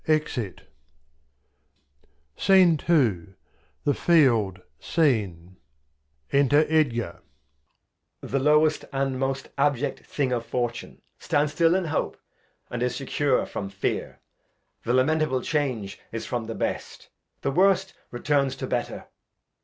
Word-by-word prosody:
[Exit. 150 - -1 1.8
The 155 - +3 0.6
Field 115 - +3 0.2
SCENE, 100 - 0 0.7
Enter 145 +2 +4
Edgar. 145 -7 0 1.0
Edg. - - -6
The 135 - +1
lowest 150 +2 +3
and 135 -1 -1
most 135 0 -2
abject 145 -1 0
Thing 135 -3 -2
of 120 -2 -1
Fortune 120 -1 -4 0.2
Stands 145 0 0
stiU 165 +3 +3
in 190 - -2
Hope, 155 -1 -2 0.5
and 120 - -4
is 125 0 0
secure 140 0 0
from 100 - -5
Fear; 100 0 -3 0.7
The 120 - +1
lamentable 130 -1 +1
Change 130 -10 -2
is 115 - -5
from 120 -3 -3
the 115 - -5
Best, - - -4 0.3
The 140 - -1
worst 190 +3 +3 0.2
returns 140 +2 0
to - - -5
better. - - -3
135 Hz, 110 wpm, -25 LUFS, 120-155 Hz, 1.8 s, Enter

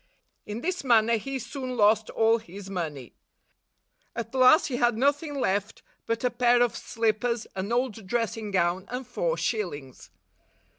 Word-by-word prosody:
In 210 +3 -5
this 365 +2 -2
manner 230 -2 +4
he 270 +5 -4
soon 255 +1 -5
lost 215 0 +3
all 225 +1 +3
his 195 -1 -10
money. 150 -9 -5 1.0
At 230 +1 -5
last 260 +4 +6
he 255 -5 -2
had 240 -2 +2
nothing 285 +3 0
left 200 -1 -1 0.2
but 230 +1 -1
a 250 - +2
pair 245 0 +4
of 240 - -1
slip 220 -2 -1
pers, 235 -1 -1
an 195 +3 -3
old 235 -4 -1
dressing 225 -1 -2
gown, 185 0 0
and 250 +1 -4
four - - -1
shillings. 150 - -4
230 Hz, 155 wpm, -27 LUFS, 205-250 Hz, 1.0 s, last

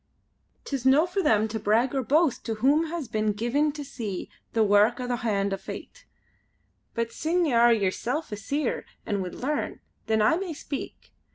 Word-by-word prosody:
"'Tis 275 -4 -3
no 270 +5 +5
for 360 +2 -1
them 220 - +3
to 220 0 -4
brag 225 +5 +2
or 270 - +1
boast 290 +3 +2
to 225 - -2
whom 285 +9 +3
has 320 -4 -4
been 215 -1 0
given 245 +8 +1
to 295 0 -6
see 215 -8 -5 0.2
the 225 - +3
wark 210 +4 +4
o' 250 - -3
the 245 -1 -1
hand 200 -4 0
o' - - -1
Fate. - - -9 0.9
But 230 -1 -1
sine 345 +6 0
ye 290 - 0
are 235 0 +6
yerself 230 - 0
a - - -2
Seer 280 +6 -2 0.2
an' 200 -1 -1
would 180 -1 -5
learn, 290 +3 -2 0.3
then 220 0 +2
I 215 +10 +4
may 365 -3 -4
speak. 285 -1 -7
240 Hz, 190 wpm, -26 LUFS, 215-295 Hz, 0.9 s, are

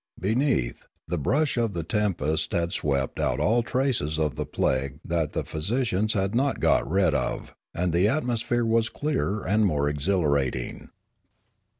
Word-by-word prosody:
Beneath, 110 - 0 0.2
the 90 - -2
brush 140 - +1
of 115 -3 +1
the 85 - -3
tempest 80 -5 -1
had 85 0 0
swept 70 -2 -1
out - - 0
all 110 +11 +3
traces 120 - 0
of 75 -4 0
the - - -3
plague 65 +1 -1
that 80 -3 -1
the - - -1
physi 100 +12 -2
cians 110 -2 0
had 95 -1 0
not 135 +3 +1
got - - +2
rid 95 +2 +3
of, - - -2 0.2
and 90 -1 0
the 90 +4 +4
atmosphere 120 -2 0
was 115 0 +2
clearer 130 -9 -2
and 105 +3 +3
more 75 -4 +1
exhilarating. 70 -5 0
95 Hz, 160 wpm, -26 LUFS, 75-115 Hz, 0.2 s, the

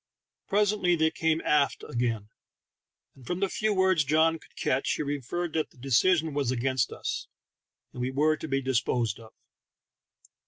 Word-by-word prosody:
Presently 205 -3 +2
they 160 -1 +2
came 160 0 0
aft 145 -2 +1
again, 115 -3 -2 0.8
and 130 -3 -17
from 180 - -2
the 195 0 +1
few 215 +2 0
words 185 -5 +3
John 160 +3 +2
could - - -21
catch 130 +2 0
he - - -2
inferred 145 +4 -3
that 160 -1 -1
the - - -25
decision 155 +6 +2
was 140 -3 0
against 130 +1 0
us, - - -4 0.7
and 125 - -6
we 125 - 0
were 150 +4 +2
to 160 - -7
be 135 -1 -1
dis 130 -2 +2
posed 115 -4 -1
of. 110 -1 -14
150 Hz, 165 wpm, -28 LUFS, 130-165 Hz, 0.8 s, words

